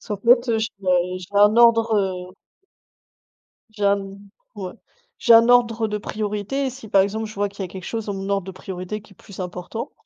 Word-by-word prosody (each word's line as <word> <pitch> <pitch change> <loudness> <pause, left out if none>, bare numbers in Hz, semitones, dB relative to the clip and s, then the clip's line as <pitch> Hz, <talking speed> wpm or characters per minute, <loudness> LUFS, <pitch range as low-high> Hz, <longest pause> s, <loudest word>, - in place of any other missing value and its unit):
Parce - - -17
qu'en 210 - -2
fait, 240 +4 +4
heu, 225 - +2
j'ai 220 +1 -2 0.5
j'ai 180 0 -11
un 205 +2 +5
ordre, 230 -1 +5
heu 185 -2 -2 1.4
j'ai 210 -1 -4
un 200 0 +4 0.6
o 195 -3 -5
ouais - - -10 0.5
j'ai 235 - +6
un 230 +1 +7
ordre 235 -2 +3
de 210 0 -2
priorité, 210 +6 -3
et 260 - -2
si, 250 -3 -11
par 200 -1 +4
exemple, 220 +3 -2
je 215 - -10
vois 205 0 0
qu'il 200 0 -8
y - - -2
a - - -6
quelque 185 0 -9
chose 225 -2 -4
dans 205 - -3
mon 195 0 -5
ordre 195 -2 -1
de - - -5
priorité 190 +2 -6
qui 210 0 -19
est - - -22
plus 200 0 -14
important, 180 +5 -6
210 Hz, 225 wpm, -22 LUFS, 195-225 Hz, 1.4 s, un